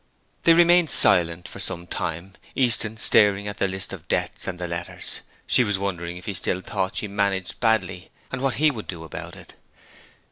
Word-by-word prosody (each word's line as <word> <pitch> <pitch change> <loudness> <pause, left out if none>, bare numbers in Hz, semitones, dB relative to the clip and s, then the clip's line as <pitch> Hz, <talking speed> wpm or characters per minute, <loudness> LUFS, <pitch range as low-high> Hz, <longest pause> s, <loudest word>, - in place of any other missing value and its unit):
They 165 - +7
remained 175 -1 +5
silent 85 -1 +5
for - - -9
some 85 - -5
time, 85 +2 -4 0.2
Easton 115 -4 +1
staring 105 -2 +3
at 105 - -6
the 100 - +2
list 95 0 -4
of - - -10
debts - - -2
and 95 -2 -4
the 90 0 -4
letters. 85 0 -6 0.3
She 125 - +4
was 105 -3 -1
wondering 90 -3 -4
if 90 - -11
he 100 - -3
still 95 0 -2
thought 95 0 -3
she 105 - -3
managed 100 -2 -2
badly, 95 -6 0 0.2
and 130 - -4
what 135 -4 0
he 155 +3 +3
would 110 -6 -8
do 85 -3 -7
about 80 - -8
it. - - -14
95 Hz, 190 wpm, -23 LUFS, 90-110 Hz, 0.3 s, They